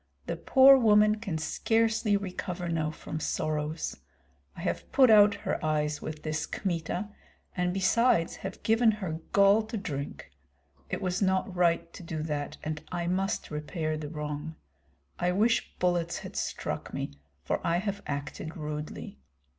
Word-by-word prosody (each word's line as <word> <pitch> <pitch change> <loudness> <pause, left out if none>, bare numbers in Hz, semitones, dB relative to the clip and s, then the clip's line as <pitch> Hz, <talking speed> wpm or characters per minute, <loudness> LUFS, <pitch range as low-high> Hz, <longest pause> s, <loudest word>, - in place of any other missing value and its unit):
The - - -2
poor 270 0 +7
woman 210 -2 +5
can 200 -7 -3
scarcely 225 +5 +1
recover 180 -2 -4
now 160 -2 0
from 155 0 -6
sorrows. 155 - -2 0.6
I - - -6
have - - -3
put 260 -4 +6
out 205 -1 +7
her - - -1
eyes 150 -1 0
with 155 -1 -6
this 155 -1 -2
Kmita, 180 +2 -2 0.5
and 180 -1 +1
besides 195 -1 +2
have - - -7
given 225 0 +4
her 185 -7 -4
gall 200 +2 +6
to 225 0 -4
drink. 145 -9 -5 0.6
It - - -3
was 185 +1 -1
not 190 -1 +1
right 170 -1 +2
to - - -9
do 160 -2 -4
that, 145 -2 -3
and 155 -1 -4
I 175 -1 -2
must 190 +2 -1
repair 155 +1 -2
the 155 -1 -5
wrong. 150 0 -5 0.6
I 175 0 +2
wish 225 +5 +1
bullets 175 -1 0
had - - -8
struck - - -3
me, - - -3 0.3
for - - -1
I 170 0 +2
have 200 +2 -3
acted 145 +3 -5
rudely. 150 - -6
175 Hz, 155 wpm, -29 LUFS, 155-205 Hz, 0.6 s, poor